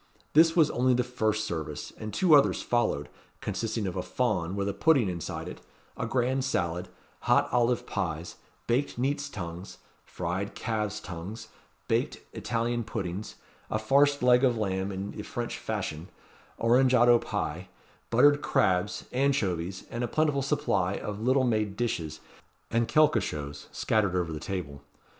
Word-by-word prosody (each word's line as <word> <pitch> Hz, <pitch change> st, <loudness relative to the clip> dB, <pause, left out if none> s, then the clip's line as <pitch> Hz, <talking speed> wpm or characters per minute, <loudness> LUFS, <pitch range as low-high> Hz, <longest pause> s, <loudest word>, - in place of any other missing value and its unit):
This 160 Hz, +2 st, +6 dB
was 160 Hz, -4 st, +5 dB
only 125 Hz, +1 st, +2 dB
the 125 Hz, -, +2 dB
first 110 Hz, -3 st, 0 dB
service; 80 Hz, -6 st, -5 dB
and 110 Hz, 0 st, -6 dB
two 165 Hz, -, +3 dB
others 145 Hz, -2 st, +5 dB
followed, 110 Hz, -12 st, 0 dB, 0.3 s
consisting 110 Hz, -1 st, -2 dB
of 95 Hz, -, -3 dB
a -, -, -1 dB
fawn, 85 Hz, +2 st, -1 dB
with 100 Hz, 0 st, -1 dB
a 100 Hz, -, -1 dB
pudding 125 Hz, +3 st, +3 dB
inside 85 Hz, -3 st, -4 dB
it, -, -, -8 dB, 0.3 s
a -, -, -3 dB
grand 130 Hz, +2 st, +1 dB
salad, 90 Hz, -8 st, -1 dB, 0.3 s
hot -, -, +3 dB
olive 120 Hz, -2 st, +2 dB
pies, 80 Hz, 0 st, -3 dB, 0.3 s
baked 125 Hz, +3 st, 0 dB
neats' 140 Hz, +3 st, -1 dB
tongues, 90 Hz, -4 st, -7 dB, 0.3 s
fried 90 Hz, +3 st, -4 dB
calves' 105 Hz, -3 st, -2 dB
tongues, 100 Hz, +5 st, -7 dB, 0.4 s
baked -, -, 0 dB, 0.2 s
Italian 120 Hz, 0 st, -1 dB
puddings, 100 Hz, -2 st, -5 dB, 0.3 s
a -, -, 0 dB
farced 140 Hz, +5 st, +3 dB
leg 125 Hz, +1 st, +5 dB
of 125 Hz, -3 st, +3 dB
lamb 95 Hz, -2 st, -1 dB
in 95 Hz, +1 st, -4 dB
the 105 Hz, -, -6 dB
French 120 Hz, +3 st, -4 dB
fashion, 95 Hz, -7 st, -4 dB, 0.5 s
orangeado 120 Hz, 0 st, +5 dB
pie, 90 Hz, -1 st, -3 dB, 0.4 s
buttered 145 Hz, +5 st, +5 dB
crabs, 95 Hz, -7 st, +1 dB
anchovies, 100 Hz, -10 st, 0 dB
and 120 Hz, -, -3 dB
a -, -, 0 dB
plentiful 150 Hz, +1 st, +1 dB
supply 135 Hz, -10 st, 0 dB
of 105 Hz, +1 st, -5 dB
little 130 Hz, +3 st, +3 dB
made 110 Hz, -4 st, 0 dB
dishes, 80 Hz, -10 st, -2 dB, 0.5 s
and 115 Hz, 0 st, +2 dB
quelquechoses, 75 Hz, -, +1 dB
scattered 100 Hz, -4 st, +1 dB
over 85 Hz, -3 st, -1 dB
the 75 Hz, -, -4 dB
table. 75 Hz, -6 st, -5 dB
110 Hz, 150 wpm, -28 LUFS, 90-125 Hz, 0.5 s, This